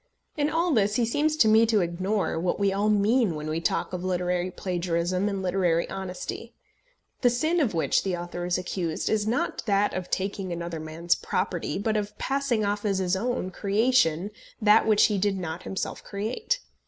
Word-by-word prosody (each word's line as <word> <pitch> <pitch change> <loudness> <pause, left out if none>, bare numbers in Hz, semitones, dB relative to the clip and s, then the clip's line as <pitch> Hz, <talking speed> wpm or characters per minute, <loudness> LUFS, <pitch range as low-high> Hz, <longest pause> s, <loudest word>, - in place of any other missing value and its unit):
In 295 0 +1
all 335 +2 +1
this 210 -3 +2
he 240 - +2
seems 295 +6 +1
to 225 - +5
me 220 +1 +5
to 215 -3 +3
ignore 185 +2 -1
what 175 +4 -1
we 200 -1 +2
all 205 +2 +1
mean 210 -1 +3
when 150 0 -5
we 155 +1 -2
talk 170 - -1
of 180 0 -3
literary 180 0 0
plagiarism 180 +1 -1
and 195 -1 -3
literary 180 -2 +1
honesty. 190 -1 -6 0.7
The 245 - +5
sin 315 +9 +1
of 245 - +1
which 160 - +2
the 185 -2 -2
author 175 0 -5
is 175 - +1
accused 180 -3 -2
is 215 -1 +1
not 235 +3 -1
that 200 0 +2
of 185 -1 -4
taking 195 -1 -2
another 170 -1 -4
man's 160 +2 0
property, 170 -4 -2
but 215 +2 -1
of 210 0 -4
passing 270 -5 0
off 205 0 -1
as 200 -3 +1
his 185 -1 +1
own 220 -2 -2
creation 200 -3 +2 0.3
that 210 0 +5
which 215 -1 +5
he 210 -2 +1
does 200 0 +1
not 175 -4 -5
himself 190 - -4
create. 250 - -2
195 Hz, 190 wpm, -26 LUFS, 180-220 Hz, 0.7 s, to